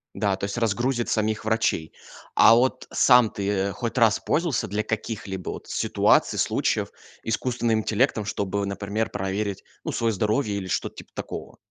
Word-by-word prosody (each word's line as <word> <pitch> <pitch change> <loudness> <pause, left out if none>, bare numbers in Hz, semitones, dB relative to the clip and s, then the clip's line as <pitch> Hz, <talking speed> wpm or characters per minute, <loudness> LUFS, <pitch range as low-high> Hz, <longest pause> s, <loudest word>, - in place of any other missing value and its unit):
Да, 100 -1 +1
то 100 - -4
есть 100 +2 -4
разгрузит 120 +2 0
самих 110 -1 0
врачей. 110 -8 0 0.4
А 115 - +8
вот 130 +2 +1
сам 125 -3 +5
ты 100 -1 -1
хоть 115 +4 -4
раз 115 -3 +4
пользовался 160 -6 0
для 105 +2 -1
каких-либо 100 -4 -4
вот - - -9
ситуаций, - - +2
случаев - - 0 0.3
искусственным 115 0 0
интеллектом, 110 0 +1
чтобы, 100 -1 -2
например, 100 +2 -2
проверить, 100 0 -3 0.2
ну, - - -3
своё 115 -1 0
здоровье 105 +2 0
или 95 -2 -5
что-то - - -2
типа - - -12
такого? - - -7
110 Hz, 155 wpm, -25 LUFS, 100-115 Hz, 0.4 s, А